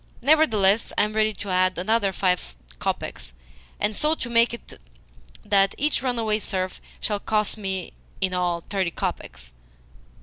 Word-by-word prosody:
Nevertheless, 225 -9 +4
I - - +5
am 210 +1 -1
ready 215 0 +2
to 200 0 -6
add 185 0 +2
another 200 +2 +2
five 180 - 0 0.2
kopecks, - - -3 0.5
and 210 +1 0
so 305 +6 +2
to 240 -6 -5
make 235 0 +5
it 235 - -8 0.7
that 195 -1 +3
each 300 +1 +1
runaway 230 -4 0
serf 185 -3 -2 0.2
shall 210 -2 -1
cost 215 0 0
me, 190 -4 -3 0.3
in 190 -1 +1
all, 175 -1 0
thirty 195 -3 0
kopecks." 60 - -4
200 Hz, 145 wpm, -24 LUFS, 185-225 Hz, 0.7 s, I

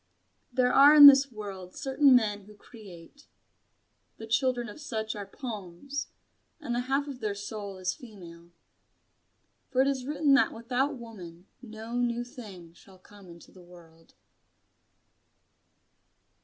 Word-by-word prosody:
There 250 0 +1
are 285 +2 +7
in 295 -1 +10
this 275 -1 +8
world 195 -4 -9
certain 270 -1 +3
men 210 -4 0
who 210 +1 -16
create. 205 - -15 0.9
The 225 - -9
children 240 +1 0
of 210 +9 -11
such 220 -6 -4
are 205 -2 -7
poems, 220 +4 -7 0.5
and 275 -6 -5
the 240 - -1
half 280 +2 0
of 270 -3 -8
their 210 -3 -3
soul 200 -1 -7
is 185 0 -2
female. 175 - -14 1.2
For 260 - -2
it - - -1
is 265 -2 -2
written 295 -1 +1
that 275 - +3
without 250 +4 -2
woman 185 -7 -12 0.2
no 225 -1 -10
new 240 -1 -1
thing 195 -9 -12
shall 190 +2 -19
come 195 0 -17
into 170 0 -15
the 185 - -17
world. 165 -2 -19
220 Hz, 140 wpm, -28 LUFS, 190-260 Hz, 1.2 s, in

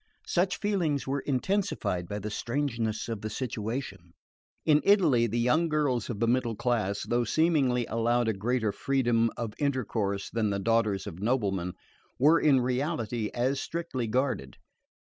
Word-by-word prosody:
Such 185 +2 +1
feelings 175 -9 0
were 140 +1 -1
intensified 135 - -1
by 105 - -3
the 105 +1 -5
strangeness 115 -3 -2
of 115 -3 -4
the 110 - -4
situation. 110 -6 -5 0.5
In 150 -1 +5
Italy 160 - +4
the 115 +2 -2
young 150 +8 +2
girls 145 -6 0
of 110 -4 -4
the 115 - +2
middle 120 -1 +1
class, 105 -4 -1
though 120 0 +1
seemingly 135 -3 +2
allowed 115 +1 +1
a 110 - +2
greater 110 +2 0
freedom 120 -1 +1
of 115 -3 -4
intercourse 110 -8 -1
than 110 -2 0
the 100 - -1
daughters 105 -1 +1
of 90 -4 -7
noblemen, 100 -6 0 0.4
were 155 +5 +5
in 140 -4 +4
reality 125 -4 -1
as 130 +3 +1
strictly 160 -8 -3
guarded. 130 +4 -1
120 Hz, 150 wpm, -28 LUFS, 110-140 Hz, 0.5 s, In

